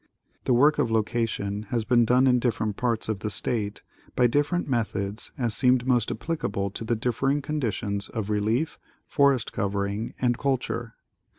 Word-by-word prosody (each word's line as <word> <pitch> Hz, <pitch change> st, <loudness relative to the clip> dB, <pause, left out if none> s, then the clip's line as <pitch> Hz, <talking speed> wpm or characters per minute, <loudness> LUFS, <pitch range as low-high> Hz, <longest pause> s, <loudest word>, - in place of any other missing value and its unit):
The 125 Hz, -, +3 dB
work 145 Hz, +5 st, +4 dB
of -, -, +2 dB
location 110 Hz, -2 st, -1 dB
has 115 Hz, -3 st, -1 dB
been 120 Hz, -1 st, +4 dB
done 125 Hz, +3 st, +4 dB
in 125 Hz, -1 st, +4 dB
different 110 Hz, -4 st, -1 dB
parts 120 Hz, -1 st, -1 dB
of 110 Hz, -3 st, -2 dB
the 105 Hz, -, -3 dB
state 105 Hz, +1 st, -2 dB, 0.3 s
by 125 Hz, -, +4 dB
different 145 Hz, +8 st, +1 dB
methods 110 Hz, -5 st, -2 dB
as 120 Hz, -4 st, 0 dB
seemed 125 Hz, -1 st, +3 dB
most 125 Hz, -4 st, +2 dB
applicable 105 Hz, -, -2 dB
to 110 Hz, -, -6 dB
the 115 Hz, +1 st, 0 dB
dif 120 Hz, +2 st, -2 dB
fering 140 Hz, +1 st, +1 dB
conditions 115 Hz, -9 st, -2 dB
of 105 Hz, -2 st, -3 dB
relief, 110 Hz, +9 st, 0 dB, 0.3 s
forest 140 Hz, -4 st, +2 dB
covering 100 Hz, +2 st, -2 dB
and 120 Hz, -1 st, +1 dB
culture. 125 Hz, -4 st, -2 dB
115 Hz, 165 wpm, -26 LUFS, 105-130 Hz, 0.3 s, work